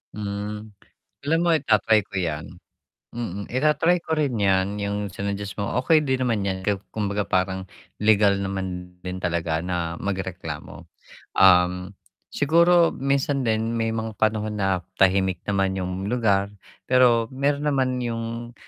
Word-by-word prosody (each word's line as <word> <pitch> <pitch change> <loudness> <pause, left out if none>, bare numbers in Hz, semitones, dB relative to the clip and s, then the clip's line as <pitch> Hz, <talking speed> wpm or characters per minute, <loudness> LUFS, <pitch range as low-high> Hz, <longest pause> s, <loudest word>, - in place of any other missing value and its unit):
Hmm. 105 +1 -5 0.5
Alam 160 +3 +1
mo 175 - +2
ita-try 110 -6 +3
ko 95 - -13
yan. 80 -3 -3 0.7
Mm, 100 -4 -5
ita-try 155 +6 +2
ko 160 - -7
rin 145 -6 +1
yan 100 -1 +1
yung 100 0 -2
sinuggest 100 +1 -4
mo, 100 - -3
okey 155 +4 +3
din 130 -2 0
naman 115 -6 0
yan 95 -1 -2
ku 105 - +3 0.2
kumbaga 105 -1 -1
parang 95 0 -1 0.3
legal 105 -2 +4
naman 90 -2 -5
din 90 0 -6
talaga 85 -2 -1
na 85 -2 -2
magreklamo. 95 -2 -5 0.5
Um, 90 0 +4 0.4
siguro 170 +3 +4
minsan 140 0 0
din 115 0 0
may 115 -1 0
mga 110 -1 -3
panahon 110 0 0
na 95 -2 +1 0.2
tahimik 95 -1 +2
naman 95 -1 0
yung 95 +1 -3
lugar, 105 -4 +1 0.3
pero 125 -3 +4
meron 140 +2 0
naman 130 -3 +1
yung, 115 0 -4
105 Hz, 140 wpm, -24 LUFS, 95-125 Hz, 0.7 s, legal